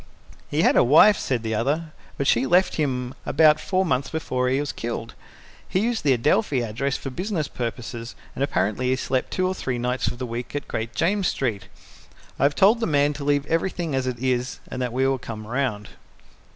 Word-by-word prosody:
"He - - +1
had - - +4
a - - +6
wife," 160 - +6
said 125 -4 -1
the 110 0 -2
other, 145 +9 -1 0.3
"but 140 - -1
she 130 0 +3
left 180 +4 +3
him 130 -4 -1
about 155 +1 +4
four 185 +4 0
months 135 -4 0
before 130 -5 -1
he 130 +2 +1
was 145 0 -2
killed. 115 0 -5 0.6
He 185 - +1
used 230 -2 -1
the 140 -2 +4
Adelphi 135 - +2
address 120 +5 -2
for 135 - -6
business 175 0 -2
purposes 120 -1 -5 0.2
and 135 - -2
apparently 125 -3 0
he 130 - +3
slept 130 0 -1
two 185 - 0
or 185 - -1
three 130 -8 -3
nights 125 +2 -1
of - - -3
the 125 - -4
week 120 +3 -6
at 145 - -3
Great 110 +1 -4
James 195 +1 +1
Street. 105 -8 -2 0.7
I - - +1
have 145 0 +2
told 210 +8 +5
the 230 - 0
man 145 -2 +2
to 145 - -7
leave 145 0 +1
everything 165 0 -1
as 130 -1 0
it 125 -2 -2
is, 125 0 -1
and 130 - -5
that 125 -1 -1
we 130 +2 +1
will 135 -1 0
come 110 -3 -7
round." 115 -4 -2
135 Hz, 210 wpm, -24 LUFS, 120-155 Hz, 0.7 s, a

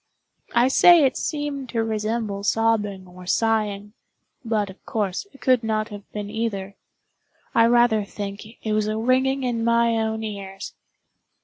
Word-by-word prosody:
I 240 +2 +5
say 330 +3 +7
it 265 - +1
seemed 290 -4 -3
to 230 -2 0
resemble 215 -1 -2
sobbing 210 -3 0
or 180 0 -13
sighing—but, 210 0 -2
of 190 - -19
course, 205 - -2
it 275 - -19
could 255 -2 +3
not 215 0 -1
have 205 -2 -11
been 210 -1 -5
either. 205 -3 -3 0.8
I 230 0 +5
rather 240 -3 +4
think 200 0 -6 0.2
it 215 - 0
was 215 0 +1
a 215 0 -1
ringing 260 +3 +1
in 235 -2 -1
my 235 0 +3
own 220 0 -1
ears. 195 -2 -6
220 Hz, 145 wpm, -23 LUFS, 205-235 Hz, 0.8 s, say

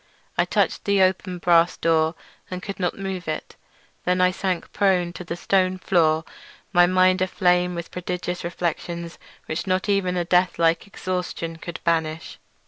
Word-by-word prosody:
I - - +2
touched - - 0
the 200 -1 +4
open 185 0 0
brass 175 0 +3
door, 160 0 +2 0.3
and 185 0 -6
could 200 -3 -6
not 180 -2 -1
move 190 -3 -5
it. 155 - -4 0.5
Then 180 0 +1
I 180 0 +4
sank 185 -1 -3
prone 180 -3 +2
to 180 - -7
the 170 - -5
stone 185 +1 +1
floor, 160 -4 +2 0.5
my 175 0 +6
mind 185 0 +3
aflame 180 -1 +2
with 170 -1 -6
prodigious 180 0 -4
reflections 170 0 -4 0.3
which 160 +4 -4
not 185 +1 0
even 190 -3 +1
a 175 - 0
death 180 +1 +2
like 165 +2 +2
exhaustion 180 -4 -4
could 170 +1 -7
banish. 160 -1 -1
180 Hz, 160 wpm, -23 LUFS, 170-185 Hz, 0.5 s, my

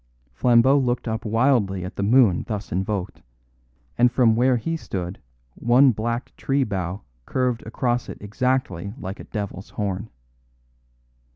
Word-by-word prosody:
Flambeau 125 - +4
looked 125 -2 -1
up 110 +1 -3
wildly 110 -5 +2
at 90 - -7
the - - -3
moon 110 -3 +4
thus 105 -2 -4
invoked; 95 +1 -3 0.8
and 125 0 +5
from 120 -3 +4
where 125 +2 +3
he 165 +9 -2
stood 95 - -5 0.3
one 125 - +4
black 115 +2 -3
tree 135 0 +1
bough 95 -3 -3 0.2
curved 125 -2 0
across 120 +1 -1
it - - -7
exactly 105 -3 -2
like 95 -5 -6
a - - -9
devil's 100 -2 -5
horn. 100 +1 -3
115 Hz, 135 wpm, -23 LUFS, 100-125 Hz, 0.8 s, and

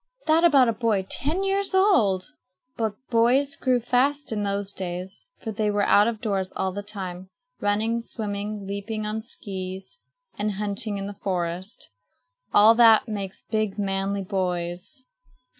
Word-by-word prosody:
That 320 +1 +4
about 280 -7 +6
a 230 - +2
boy 215 -3 0
ten 315 +9 0
years 390 0 0
old! 225 - +4 0.5
But 220 -2 -1 0.2
boys 250 +5 +3
grew 255 -2 +1
fast 270 +4 +1
in 215 -2 -1
those 200 0 -2
days 185 - -6
for 225 - -5
they 215 0 0
were 205 0 +1
out 205 +2 +5
of 225 -2 -3
doors 195 -4 -1
all 190 0 -1
the 205 +2 -5
time, 190 -3 -6 0.3
running, 220 +3 0
swimming, 210 -2 -4
leaping 200 +2 -4
on 215 +1 -3
skees, 190 - -6 0.4
and 210 0 0
hunting 205 +1 -1
in 195 - -4
the 205 0 -8
forest. 180 +1 -3 0.6
All 215 +2 +7
that 230 -1 +6
makes 200 -3 -4
big, 215 -3 -1
manly 195 0 -1
boys. 180 - -2
210 Hz, 150 wpm, -25 LUFS, 195-230 Hz, 0.6 s, All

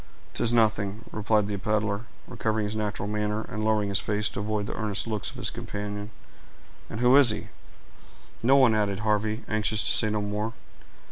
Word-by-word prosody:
"'Tis 115 - +1
nothing," 110 -2 +1
replied 105 0 +1
the 105 0 -3
peddler, 105 +1 -1 0.2
recovering 110 -1 -1
his 105 +1 -3
natural 105 -2 -2
manner, 105 +1 -1
and 110 +2 -4
lowering 110 -2 +1
his 100 - +4
face 105 0 0
to - - -6
avoid 105 0 -2
the - - -4
earnest 105 -2 0
looks 110 -3 -2
of - - -11
his - - -1
companion. 105 0 -5 0.8
"And 110 - -5
who 125 +2 +6
is 140 -4 +7
he?" 105 - -3 0.9
"No 130 +4 +5
one," 130 -5 +6
added 105 -2 0
Harvey, 110 +1 0
anxious 110 0 0
to - - 0
say 110 - +4
no 105 0 0
more. 105 +2 -3
105 Hz, 185 wpm, -27 LUFS, 105-110 Hz, 0.9 s, is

